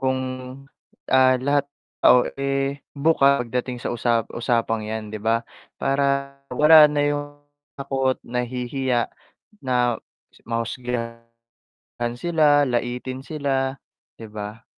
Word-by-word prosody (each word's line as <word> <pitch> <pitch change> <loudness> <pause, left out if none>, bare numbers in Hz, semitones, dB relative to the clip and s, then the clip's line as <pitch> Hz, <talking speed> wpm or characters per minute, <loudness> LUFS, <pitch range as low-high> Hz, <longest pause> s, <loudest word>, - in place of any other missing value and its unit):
kung, 130 0 +1 0.9
ah, 130 -1 +4
lahat 140 +2 0 0.3
oh, 125 -1 +6
eh 140 0 -2 0.2
bukas 140 -4 +3
pagdating 125 +1 -3
sa 120 - -3
usa 115 -1 +1
usapang 115 -2 0
yan 110 0 -5
'di 105 - -6
ba? 115 +1 +1 0.3
Para 140 0 0 0.2
wala 150 +3 +7
na 145 0 0
yung 145 0 -1 0.5
takot 135 -1 -1
nahihiya 125 0 -1 0.5
na 125 -3 0 0.5
mahusgahan 115 0 -5 0.7
sila, 150 0 +3
laitin 125 0 -2
sila 135 -2 -2 0.4
'di 110 -2 -11
ba? 105 +1 -7
130 Hz, 105 wpm, -23 LUFS, 115-140 Hz, 0.9 s, wala